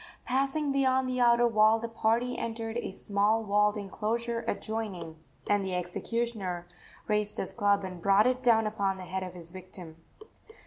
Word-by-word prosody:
Passing 275 +3 0
beyond 265 -1 +2
the 255 0 -1
outer 240 0 +5
wall, 215 0 +5
the 230 - -4
party 230 +2 0
entered 225 0 -4
a - - -3
small 205 +3 +1
walled 210 0 +2
enclosure 230 +4 -2
adjoining, 205 -7 -4 0.3
and 205 -1 +2
the 190 -1 -2
executioner 180 0 -2 0.4
raised 210 -1 0
his - - -3
club 205 -2 +2
and 180 -2 -7
brought 200 +3 +5
it 255 0 +1
down 225 -3 +4
upon 200 -3 -1
the 185 - -8
head 185 +2 -4
of 185 -1 -6
his 170 -1 -6
victim. 180 -3 -8
215 Hz, 165 wpm, -29 LUFS, 190-235 Hz, 0.4 s, outer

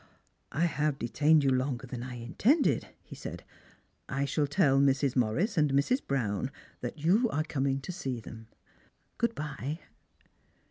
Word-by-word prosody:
" - - -45
I 165 +4 +1
have 150 -3 0
detained 150 +5 +3
you 135 - +3
longer 130 -1 0
than 125 -1 -6
I 125 0 -6
intended," 200 - +2 0.2
he - - -12
said. - - -7 0.4
" - - -42
I 140 - +2
shall 145 +1 0
tell 140 -1 +3
Mrs. 140 -1 +2
Morris 135 - +1
and 150 -2 +3
Mrs. 145 - +2
Brown 120 -3 0 0.3
that 120 +5 -5
you 195 - +3
are 155 -4 0
coming 135 -3 0
td 180 - -6
see 135 -9 -3
them. 110 0 -10 0.7
Good 235 -1 +1
bye." 150 +1 -4
140 Hz, 165 wpm, -30 LUFS, 130-155 Hz, 0.7 s, detained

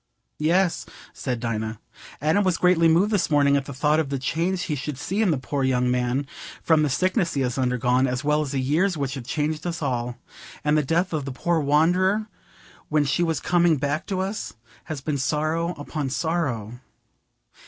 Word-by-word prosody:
"Yes," 175 +3 +1 0.3
said 125 -3 -3
Dinah, 110 -2 -3 0.4
"Adam 160 +7 +3
was 185 -3 +1
greatly 180 -2 +4
moved 175 +6 +3
this 200 -5 +1
morning 145 -2 +4
at 140 -1 0
the 140 - -7
thought 150 +3 +2
of 155 -4 -1
the 140 - -1
change 170 +7 -1
he 155 - -2
should 140 0 -4
see 195 +9 -2
in 215 - +3
the 155 - +2
poor 135 +1 -2
young 125 -1 +2
man, 125 +2 0 0.4
from 160 -2 +4
the 150 - +2
sickness 185 - 0
he 140 - +1
has 125 -2 -1
undergone, 125 +1 +2
as 125 +1 -2
well 150 +1 +2
as 150 - -3
the 135 - -1
years 160 +8 +1
which 140 -2 -2
have 130 -4 -6
changed 155 +2 -2
us 170 -1 -3
all. 125 -5 -2 0.5
And 150 0 +2
the 155 - +4
death 165 +6 0
of 150 -3 -2
the 140 - -4
poor 170 +6 0
wanderer, 180 +8 +2 0.6
when 150 -1 +2
she 140 +5 0
was 165 -4 +1
coming 175 -2 +3
back 145 +2 -2
to 190 -2 -1
us, 195 +3 -4 0.3
has 155 -5 -5
been 145 0 -2
sorrow 155 +5 0
upon 145 -1 -4
sorrow." 130 -8 -2
150 Hz, 195 wpm, -24 LUFS, 135-170 Hz, 0.6 s, greatly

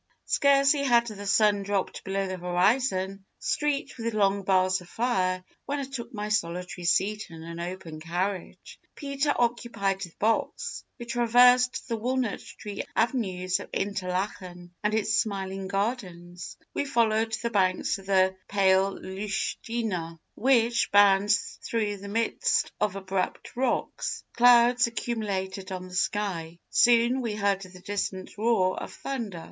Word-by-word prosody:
"Scarcely 280 +1 +4
had 240 -4 +4
the 205 -3 -7
sun 205 +1 +4
dropped 195 -1 -2
below 195 0 -1
the 185 -1 -4
horizon, 190 +2 +1
streaked 290 -3 -1
with 230 -1 -2
long 200 -1 +2
bars 185 0 +2
of 175 - -14
fire, 185 -6 0 0.2
when 285 - -1
I 280 - -2
took 260 -3 -6
my 210 -3 -4
solitary 180 -2 -2
seat 200 +5 +1
in 165 -1 -10
an 170 +1 -7
open 170 -2 -6
carriage. 180 +4 -4 0.2
Peter 280 0 -1
occupied 230 -5 0
the 175 -3 -5
box. 220 +2 -1
We 240 - -7
traversed 245 +2 +4
the 230 -2 -2
walnut 250 0 -1
tree 205 -1 -7
avenues 190 -6 0
of - - -9
Interlachen 185 -2 -3
and 210 +1 +1
its 220 0 +2
smiling 195 -3 -4
gardens. 190 -4 -4 0.2
We - - -1
followed 225 -4 +1
the 235 0 -2
banks 190 -1 +1
of 195 - -14
the 190 -1 +3
pale 195 -1 +3
Lütschina, 195 -2 -3 0.2
which 240 -2 +2
bounds 205 0 +4
through 210 -3 -1
the 200 +1 -9
midst 225 +3 0
of 210 -2 +1
abrupt 190 -1 -3
rocks. 260 +2 -1
Clouds 245 +1 +6
accumulated 200 -5 -3
on 185 0 -5
the - - -13
sky. 180 -4 -1
Soon 240 +2 +4
we 225 -4 -2
heard 200 -2 +1
the 185 -1 -11
distant 190 -1 -4
roar 210 -5 +2
of - - -7
thunder. 230 -10 -5
205 Hz, 140 wpm, -27 LUFS, 185-235 Hz, 0.2 s, Clouds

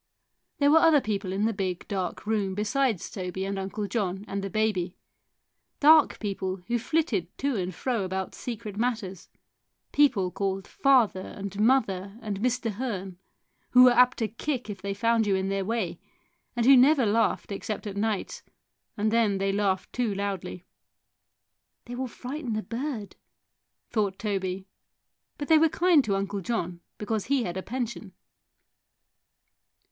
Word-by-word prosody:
There 285 0 +4
were 320 - +7
other 320 -2 +6
people 200 -5 -3
in 200 +3 0
the 225 - +1
big, 185 -3 -3
dark 190 -3 -3
room 205 -3 0
besides 215 0 0
Toby 190 0 -4
and 195 0 -3
Uncle 195 +2 -3
John 200 -2 -2
and 200 0 -3
the 195 - -3
baby; 200 -4 -1 0.8
dark 310 +1 +6
people 195 -3 -3
who 240 0 0
flitted 240 - 0
to 275 -1 -1
and 185 -2 -2
fro 230 +4 -2
about 190 0 -3
secret 215 -4 -6
matters, 215 -6 -2 0.6
people 225 -11 +3
called 195 0 -2
father 255 -8 +3
and 200 +1 -7
mother 210 -4 +1
and 205 -3 -3
Mr. 245 0 0
Hearn, 195 -5 -5 0.5
who 250 0 +9
were 250 - +8
apt 250 +1 +5
to 225 - 0
kick 240 +1 -4
if 195 -2 -9
they 200 0 -3
found 230 0 +2
you 195 - +3
in 190 0 -1
their 195 0 -1
way, 220 -2 -2 0.6
and 235 -1 +1
who 270 +1 +8
never 265 +1 +5
laughed 220 0 +1
except 210 +2 -4
at 200 -2 -5
nights, 210 -1 -2 0.6
and 215 +1 +1
then 220 -4 +2
they 195 0 0
laughed 195 -1 -1
too 235 -5 -1
loudly. 190 -3 -4 1.2
"They 240 - -8
will 255 +1 -3
frighten 255 +1 -5
the 215 0 -2
bird," 235 -4 -5 0.7
thought 205 -4 0
Toby; 190 -2 -3 0.7
but 290 - -5
they 320 -1 +6
were 325 0 +4
kind 340 -2 +4
to 200 -2 0
Uncle 195 0 -2
John 175 -4 -3 0.2
because 215 0 -2
he 275 -3 +1
had 175 -4 -4
a 190 - -3
pension. 235 -4 -5
210 Hz, 160 wpm, -27 LUFS, 195-245 Hz, 1.2 s, who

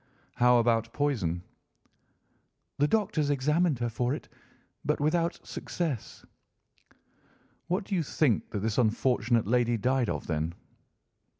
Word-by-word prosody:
"How 125 0 +5
about 115 -1 +2
poison?" 105 - -1 1.4
"The 145 - +4
doctors 155 -7 +1
examined 150 +3 +2
her 120 0 -1
for 125 +4 -1
it, - - -9 0.6
but - - 0
without 165 +3 +1
success." 155 - -4 1.4
"What 180 +3 0
do 195 - -6
you 180 - +2
think 140 -6 +1
that 105 -4 -3
this 110 +3 0
unfortunate 120 0 +2
lady 120 +1 +2
died 125 +1 +1
of, - - -3
then?" 80 +1 -2
125 Hz, 120 wpm, -29 LUFS, 115-150 Hz, 1.4 s, How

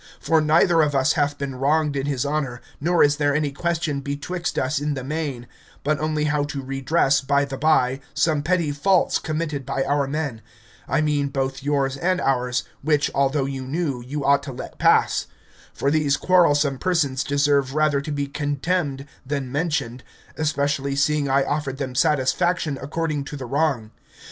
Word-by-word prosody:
For 160 -1 +2
neither 165 +2 +4
of 145 -2 +1
us 135 -1 +3
hath 145 -2 0
been 140 -1 -4
wronged 145 +3 +1
in 135 0 -2
his 140 -2 -1
honour, 140 -4 -2 0.2
nor 170 +4 +3
is 145 0 +3
there 145 -2 +1
any 150 -2 0
question 160 -1 -1
betwixt 145 +6 -4
us 135 +2 0
in 145 0 -2
the 135 - -5
main, 140 -4 -3 0.4
but 150 +1 0
only 155 -1 -1
how 150 -1 +1
to 140 -2 -5
redress, 135 +1 +1
by 140 +1 +2
the 135 -1 -6
bye, 135 -3 +2 0.2
some 155 -2 +2
petty 170 0 +1
faults 175 +6 +2
committed 155 -3 -3
by 135 +1 -1
our 140 0 0
men, 140 -6 -3 0.5
I - - +1
mean, 150 -2 +1
both 135 -1 -2
yours 140 -1 0
and 185 +5 +1
ours, 125 -3 0 0.2
which, 150 0 +1
although 140 0 +1
you 135 -1 -5
knew, 140 -3 -2
you 140 +4 -4
ought 140 0 +4
to 140 -1 -7
let 125 - -9
pass; - - +3 0.4
for 140 - -1
these 145 -3 +2
quarrelsome 145 -7 +3
persons 145 -8 +1
deserve 140 -1 +1
rather 155 -2 +2
to 150 - -6
be 145 -1 -1
contemned 145 0 -2 0.2
than 135 -2 -3
mentioned, 140 -5 -2 0.3
especially 140 -2 -1
seeing 140 0 +1
I 135 +1 +3
offered 145 -2 -2
them 135 -2 -4
satisfaction 150 +2 +1
according 150 0 -2
to 145 - -7
the 130 - -6
wrong. 135 -5 0
145 Hz, 175 wpm, -23 LUFS, 135-155 Hz, 0.5 s, neither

